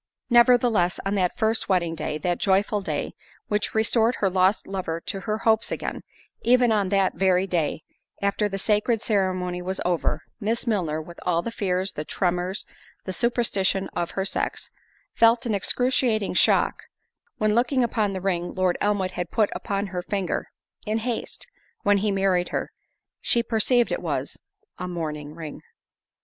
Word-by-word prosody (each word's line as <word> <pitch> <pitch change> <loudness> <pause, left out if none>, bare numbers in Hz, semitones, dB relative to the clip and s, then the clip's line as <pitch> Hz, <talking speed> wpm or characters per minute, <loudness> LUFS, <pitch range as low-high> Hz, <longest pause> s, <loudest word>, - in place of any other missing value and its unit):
Nevertheless, 235 -6 +4
on 195 - 0
that 185 -3 0
first 220 -1 +1
wedding 175 -3 +2
day, 150 -1 -3
that 175 +3 -1
joyful 200 +1 +2
day, - - -3 0.4
which 210 +1 -1
restored 225 +2 +3
her 195 -2 0
lost 185 +3 +2
lover 185 -4 -3
to 195 - -4
her 215 +3 -2
hopes 220 0 +2
again; - - -3 0.4
even 245 -1 +4
on 205 -3 +2
that 195 -1 +2
very 190 -1 +2
day, 165 -4 -1 0.4
after 200 +1 0
the 195 - -3
sacred 210 +3 +1
ceremony 185 -4 0
was 190 +1 -3
over, 170 -3 0 0.2
Miss 225 +2 -1
Milner—(with 170 -6 -2
all 170 -1 +1
the 235 - -4
fears, 190 -2 -1
the 150 - -5
tremors, 180 +3 -1 0.4
the 185 - -3
superstition 195 -3 +1
of 175 -1 -3
her 195 - +1
sex)—felt 230 +3 0
an 230 - 0
excruciating 230 0 +1
shock; - - +3 0.6
when, 215 0 +2
looking 245 +2 +2
on 215 -4 0
the 190 - -4
ring 175 -2 -1
Lord 185 -1 +1
Elmwood 200 -3 +1
had 175 -1 -4
put 215 -3 +1
upon 200 0 -2
her 180 -2 -4
finger, 195 0 -2 0.4
in 215 0 -1
haste, 230 0 -3 0.4
when 205 -1 +4
he 210 +2 0
married 190 -2 +1
her, - - -3 0.5
she 235 - +1
perceived 235 +1 +2
it - - -1
was - - -2 0.4
a—mourning 155 -4 -4
ring. 160 -3 -8
195 Hz, 155 wpm, -25 LUFS, 180-220 Hz, 0.6 s, Nevertheless